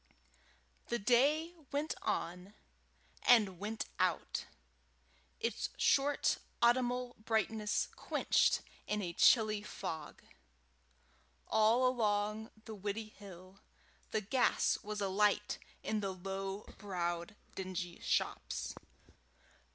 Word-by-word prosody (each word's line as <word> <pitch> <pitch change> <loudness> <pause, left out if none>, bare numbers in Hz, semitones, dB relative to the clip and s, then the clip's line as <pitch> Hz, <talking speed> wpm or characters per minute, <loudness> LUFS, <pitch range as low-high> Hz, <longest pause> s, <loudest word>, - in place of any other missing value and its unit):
The 235 - 0
day 280 - +3 0.2
went 290 +2 0
on, 180 +4 -3 0.7
and 210 -7 +5
went 215 +2 -3
out, - - 0 0.9
its 460 - -1
short 285 +1 +3 0.2
autumnal 245 +1 +2
brightness 220 -1 +1
quenched - - +2 0.3
in 210 -1 -1
a 175 -2 -3
chilly 215 +1 +5
fog. 160 -7 -6 1.2
All 220 +4 +4
along 215 -2 0 0.2
the 220 - -7
Widdiehill, 200 -2 -7 0.5
the 215 - 0
gas 245 +6 +2
was 210 0 -4
alight 205 +1 +2 0.2
in 215 - 0
the 195 -2 -3
low 195 +2 -4 0.2
browed 175 -1 -3 0.2
dingy 185 -2 -4
shops. - - -1
210 Hz, 90 wpm, -35 LUFS, 195-235 Hz, 1.2 s, and